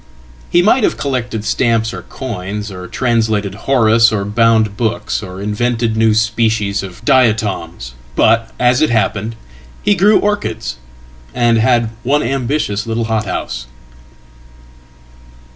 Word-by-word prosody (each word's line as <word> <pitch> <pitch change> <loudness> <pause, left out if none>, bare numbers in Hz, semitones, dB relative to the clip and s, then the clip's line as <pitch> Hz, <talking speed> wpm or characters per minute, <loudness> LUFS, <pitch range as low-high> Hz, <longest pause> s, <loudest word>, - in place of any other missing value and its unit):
He 175 - +3
might 225 +5 +3
havecollected 125 - -1
stamps 115 +1 +1
or - - -6
coins, 105 -4 -6
or 90 -1 -8
translated 110 -5 0 0.2
Horace, 115 -3 +4
or 100 -2 -1
bound 110 -1 +2
books, 115 +1 -2
orinvented 110 +4 -2
new 110 -1 +3
species 110 -2 +1
of 95 +3 -10
diatoms. 105 - +1 0.2
But, 115 0 +3
as 125 +2 +3
it 155 - +3
happened, 110 -1 0 0.5
he 205 - +4
grew 200 +3 +4
orchids, 115 - -2 0.6
andhad 115 0 +2
one 140 +5 +1
ambitious 120 -4 -1
little 115 +1 -1
hothouse." 105 - -3
115 Hz, 110 wpm, -16 LUFS, 105-120 Hz, 0.6 s, Horace